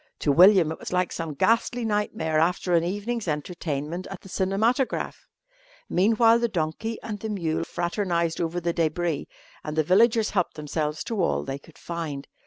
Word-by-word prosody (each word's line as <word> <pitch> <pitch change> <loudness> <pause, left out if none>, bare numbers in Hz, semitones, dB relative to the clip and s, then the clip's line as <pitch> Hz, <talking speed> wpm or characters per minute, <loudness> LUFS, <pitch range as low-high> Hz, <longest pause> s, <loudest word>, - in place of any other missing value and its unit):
To 145 - +2
William 180 +1 +6
it 160 - -6
was - - -7
like 180 -1 +1
some 165 -3 -4
ghastly 230 - +1
nightmare 205 -7 0
after 180 +2 +1
an 165 -1 +4
evening's 205 +4 -3
entertainment 155 +1 -3
at 195 - -8
the 195 - -13
cinematograph. 215 +8 0 0.6
Meanwhile 225 +4 +4
the 235 - +1
donkey 190 +5 -3
and 210 -2 -5
the 220 - -4
mule 165 -6 -1
fraternised 175 -1 -1
over 170 +1 -1
the 170 0 -1
débris 165 -2 -1 0.4
and 150 0 -5
the 155 - +3
villagers 220 +6 +4
helped 180 -4 0
themselves 150 0 -3
to 220 -4 -2
all 170 - +1
they 135 0 -5
could 155 +2 -19
find. 160 -5 -5
175 Hz, 170 wpm, -25 LUFS, 160-210 Hz, 0.6 s, William